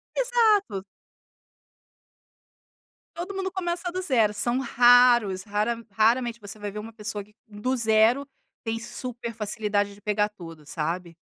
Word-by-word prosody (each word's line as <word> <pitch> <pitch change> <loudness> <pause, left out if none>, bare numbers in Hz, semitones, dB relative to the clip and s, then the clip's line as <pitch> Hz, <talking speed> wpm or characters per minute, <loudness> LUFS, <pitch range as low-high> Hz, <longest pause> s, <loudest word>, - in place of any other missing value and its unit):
Exato. 440 - +2 2.3
Todo 360 +3 -5
mundo 385 -1 -2
começa 355 -1 -3
do 370 - -2
zero, 230 - +2
são 240 +4 0
raros, 240 -6 +5
rara 215 +3 -1
raramente 235 +3 +2
você 205 -1 -8
vai 205 0 -4
ver 210 +1 -6
uma 220 +2 -8
pessoa, 215 -1 -5
que 210 +1 -24
do 215 +4 -3
zero 225 +4 +3 0.3
tem 225 -1 -3
super 235 0 -6
facilidade 210 -2 -1
de 200 - -18
pegar 210 0 +1
tudo, 165 -7 -12
sabe. 165 +3 -4
225 Hz, 135 wpm, -26 LUFS, 205-250 Hz, 2.3 s, raros